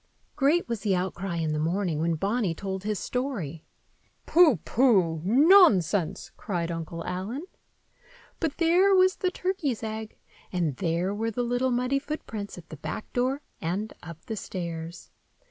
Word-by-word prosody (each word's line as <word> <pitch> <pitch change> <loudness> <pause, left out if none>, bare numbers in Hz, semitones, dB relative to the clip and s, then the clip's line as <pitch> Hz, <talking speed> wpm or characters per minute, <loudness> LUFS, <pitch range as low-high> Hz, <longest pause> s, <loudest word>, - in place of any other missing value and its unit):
Great 295 +6 +2
was 235 -2 -2
the 200 -3 +1
outcry 185 0 -2
in 160 -2 -1
the 150 - -1
morning 170 0 0
when 165 +1 +1
Bonny 200 +1 0
told 190 +1 -4
his 210 0 -1
story. 205 - -3 0.6
"Pooh! 325 - +6
pooh! 190 -11 +3
nonsense!" 215 - +4
cried 175 -4 -2
Uncle 165 0 -5
Allen. 210 - -4 1.0
But 320 -4 -2
there 360 +4 +4
was 370 0 +4
the 370 - 0
turkey's 360 - -2
egg, 220 0 -5 0.3
and 170 -7 0
there 175 +2 0
were 225 +2 -1
the 245 +2 -2
little 245 +2 0
muddy 250 +3 +1
footprints 225 -10 -6
at 170 -1 -12
the 155 - -8
back 185 - -6
door 260 +4 0 0.2
and 190 +7 -2
up 170 -2 -11
the 220 - -4
stairs. 170 -4 -6
205 Hz, 150 wpm, -27 LUFS, 170-260 Hz, 1.0 s, Pooh